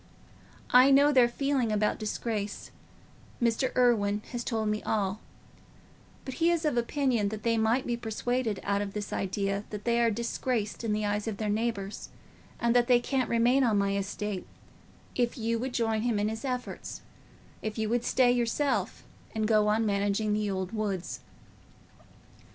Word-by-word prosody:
I 255 +2 +7
know 280 +2 +6
their 255 -4 +6
feeling 270 -2 0
about 210 0 +1
disgrace—Mr. 225 +3 -4
Irwine 215 -5 +2
has 240 -1 -3
told 220 -3 -1
me 210 0 -1
all; 205 -1 -1 1.1
but 265 - -5
he 335 +4 +2
is 340 -2 +1
of 300 - +1
opinion 240 -3 +1
that 215 0 -6
they 230 -1 +2
might 225 +3 +2
be 240 - -1
persuaded 235 -1 -2
out 200 0 0
of 200 -1 -4
this 210 -1 -4
idea 195 +1 -1
that 210 -1 -6
they 235 0 +2
are 235 - +4
disgraced 230 0 -2
in 225 - -1
the 210 0 0
eyes 205 +1 -1
of 215 -3 -3
their 210 -1 -1
neighbours, 210 -2 -3 0.5
and 235 0 +2
that 240 -1 +4
they 245 -2 +5
can't 260 +1 -1
remain 240 +4 +3
on 225 -4 +3
my 200 0 +1
estate, 200 0 -3 0.7
if 240 -1 0
you 230 0 -1
would 260 +2 -3
join 225 -2 +1
him 235 -2 0
in 205 +1 +1
his 220 +3 -5
efforts—if 250 -3 -7
you 220 -1 0
would 235 +2 0
stay 245 0 +3
yourself 245 +4 0 0.3
and 215 -1 0
go 215 -1 +3
on 220 +2 +2
managing 205 +1 +1
the 210 0 0
old 190 -1 -3
woods." 205 -5 -3
225 Hz, 165 wpm, -29 LUFS, 210-245 Hz, 1.1 s, I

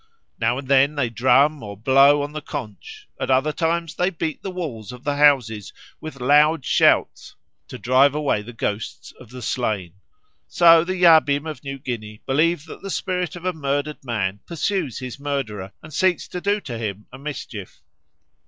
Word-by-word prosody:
Now 125 - +1
and 135 -1 -7
then 140 +2 +4
they 130 -5 -1
drum 140 +5 +3
or 100 -2 -8
blow 135 +5 +5
on 145 - -5
the 155 0 -6
conch; 105 -8 -8
at - - -3
other 135 +3 +3
times 165 0 -1
they 180 +2 +1
beat 160 -4 -4
the 195 - -5
walls 145 - -6
of 125 0 -11
the 145 -1 -1
houses 125 -8 +3 0.3
with 155 -3 -9
loud 150 +3 +4
shouts - - +2 0.3
to - - -8
drive 130 +3 +3
away 145 -8 0
the 115 +3 -10
ghosts 110 -2 -5
of 125 - -14
the 125 0 -9
slain. 105 -10 -2 0.5
So 165 -1 +6
the 185 +2 -3
Yabim 160 -5 +5
of 155 -2 -7
New 135 -1 -5
Guinea 110 -5 -7
believe 155 +3 +1
that 160 - -11
the 195 - -7
spirit 180 -1 -2
of 175 0 -10
a 185 - 0
murdered 145 -1 -3
man 105 -6 -2
pursues 170 - -2
his 130 +1 -7
murderer 120 -10 -4
and 155 0 -12
seeks 185 +3 +1
to 180 - -5
do 205 +2 +1
him 110 -5 -5
a 130 - -10
mischief. 130 -9 -8
140 Hz, 180 wpm, -22 LUFS, 120-160 Hz, 0.5 s, So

